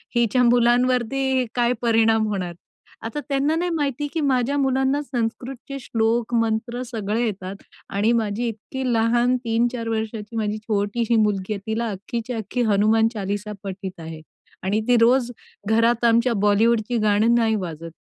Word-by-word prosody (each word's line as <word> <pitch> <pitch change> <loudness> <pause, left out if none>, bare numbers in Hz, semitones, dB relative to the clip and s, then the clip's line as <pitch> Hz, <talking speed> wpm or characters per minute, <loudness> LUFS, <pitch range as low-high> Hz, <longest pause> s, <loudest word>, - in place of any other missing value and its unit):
हिच्या 240 +1 +3
मुलांवरती 250 +2 +2
काय 240 0 +2
परिणाम 225 -1 +3
होणार? 185 -4 -3 0.5
आता 265 +6 -4
त्यांना 280 +3 +1
नाही 350 +2 -1
माहिती 290 -1 -1
की 325 - -1
माझ्या 270 0 +1
मुलांना 265 +1 +1
संस्कृतचे 250 +1 -4
श्लोक 230 0 -1
मंत्र 230 +2 -1
सगळे 225 -1 -2
येतात 195 -2 -5 0.3
आणि 205 +4 +1
माझी 220 +2 -2
इतकी 230 +4 -6
लहान 240 +2 +2
3-4 230 +1 0
वर्षाची 220 0 -4
माझी 215 0 -1
छोटीशी 215 +2 -1
मुलगी 210 -2 +1
आहे 200 - -5
तिला 230 +1 -1
अख्खीच्या 230 +5 -5
अख्खी 220 +4 -3
हनुमान 220 +2 +3
चालीसा 205 0 -4
पठित 190 -1 -6
आहे 160 -1 -8 0.4
आणि 205 +3 0
ती 245 -1 +5
रोज 245 +1 +4 0.4
घरात 230 +1 +3
आमच्या 235 +1 +3
बॉलिवूडची 225 +3 +2
गाणं 215 +2 +3
नाही 225 -2 +2
वाजत. 165 -4 -5
230 Hz, 145 wpm, -22 LUFS, 210-245 Hz, 0.5 s, ती